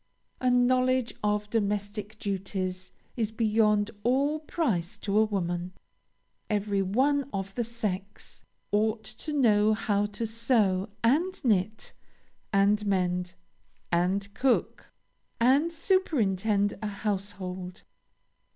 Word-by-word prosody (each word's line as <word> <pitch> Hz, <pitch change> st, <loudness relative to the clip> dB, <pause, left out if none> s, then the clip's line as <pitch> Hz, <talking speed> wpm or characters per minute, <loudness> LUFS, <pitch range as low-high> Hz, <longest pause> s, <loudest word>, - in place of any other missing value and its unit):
A 255 Hz, -, +2 dB
knowledge 255 Hz, 0 st, +3 dB
of 210 Hz, 0 st, 0 dB
domestic 210 Hz, 0 st, -2 dB
duties 190 Hz, -2 st, -3 dB, 0.2 s
is 220 Hz, -3 st, -1 dB
beyond 215 Hz, -1 st, +2 dB
all 280 Hz, +5 st, +2 dB
price 235 Hz, -, -1 dB
to 200 Hz, -1 st, -3 dB
a 220 Hz, -, +5 dB
woman. 180 Hz, -3 st, -2 dB, 0.8 s
Every 205 Hz, -1 st, 0 dB
one 265 Hz, +8 st, +1 dB
of 195 Hz, 0 st, -4 dB
the 240 Hz, -, -1 dB
sex 210 Hz, -4 st, -5 dB, 0.3 s
ought 220 Hz, +1 st, +1 dB
to 310 Hz, -, -6 dB
know 215 Hz, -6 st, +4 dB
how 205 Hz, -1 st, 0 dB
to 210 Hz, +3 st, -4 dB
sew, 220 Hz, -4 st, +1 dB
and 335 Hz, +11 st, +2 dB
knit, 215 Hz, -1 st, 0 dB, 0.6 s
and 205 Hz, +1 st, +3 dB
mend, 180 Hz, -2 st, 0 dB, 0.6 s
and 190 Hz, +4 st, 0 dB
cook, 250 Hz, +3 st, 0 dB, 0.5 s
and 275 Hz, +8 st, +4 dB
superintend 220 Hz, -, +1 dB
a 215 Hz, -, -2 dB
household. 190 Hz, -3 st, -4 dB
210 Hz, 105 wpm, -28 LUFS, 195-235 Hz, 0.8 s, a